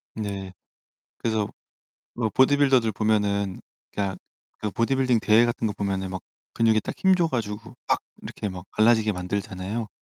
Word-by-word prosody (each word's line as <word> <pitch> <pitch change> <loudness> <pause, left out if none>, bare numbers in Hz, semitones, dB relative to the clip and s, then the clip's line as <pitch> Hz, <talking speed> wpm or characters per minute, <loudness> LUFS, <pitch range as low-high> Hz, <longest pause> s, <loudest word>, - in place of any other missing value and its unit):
네. 100 -3 -4 0.7
그래서 110 -3 0 0.7
로 115 -2 0
보디빌더들 130 -3 +4
보면은 100 -2 0 0.3
그냥 100 -2 -2 0.4
그 105 -2 -3
보디빌딩 125 +1 +2
대회 115 +2 +5
같은 120 -1 -1
거 105 - -2
보면은 95 -2 -2
막 95 -1 -5 0.3
근육에 110 -1 +3
딱 - - -5
힘 190 0 +4
줘 170 -2 +2
가지고 115 -3 -4
막 - - +3 0.2
이렇게 105 - -5
막 90 -1 -8
갈라지게 110 -1 +4
만들잖아요. 95 +3 -3
110 Hz, 310 characters per minute, -25 LUFS, 100-115 Hz, 0.7 s, 대회